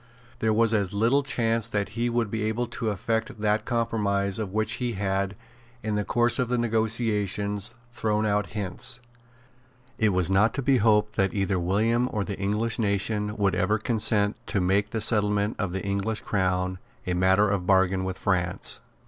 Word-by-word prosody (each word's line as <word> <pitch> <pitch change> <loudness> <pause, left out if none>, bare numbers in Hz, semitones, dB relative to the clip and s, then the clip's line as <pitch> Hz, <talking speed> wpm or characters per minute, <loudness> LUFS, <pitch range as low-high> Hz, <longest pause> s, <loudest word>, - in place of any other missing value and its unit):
There 110 - +1
was 115 +1 +3
as 100 -3 0
little 115 +7 +3
chance 115 -4 +1
that 105 -3 -1
he 120 +3 -1
would 115 -3 -1
be 110 - -2
able 110 +3 -1
to 115 -1 -3
effect 110 +2 -2
that 105 +1 +1
compromise 105 -4 0
of 105 -4 -3
which 110 +1 0
he 120 -1 -1
had, 100 0 -1 0.5
in 110 0 -2
the 105 0 0
course 120 +6 +2
of 125 -2 0
the 125 - +1
negotiations, 110 -2 0 0.2
thrown 110 -2 0
out 105 -2 +1
hints. 105 +6 -3 1.0
It 110 - +4
was 90 -2 +1
not 105 +4 +3
to 135 - -2
be 135 0 +4
hoped 105 -1 +2
that 95 0 +1
either 95 -2 0
William 110 +7 +1
or 105 -3 -1
the 100 -1 -5
English 105 +4 -1
nation 105 0 -1
would 100 -2 +2
ever 105 +4 +1
consent 105 -2 +1
to 100 - 0
make 100 +3 +1
the 110 0 -3
settlement 105 -1 +2
of 100 -4 -1
the 95 0 -4
English 100 +3 -1
crown 90 -2 -1 0.3
a 90 - -1
matter 95 +3 +3
of 100 -3 -1
bargain 95 -1 +3
with 95 0 -3
France. 90 -3 -1
105 Hz, 180 wpm, -26 LUFS, 100-115 Hz, 1.0 s, It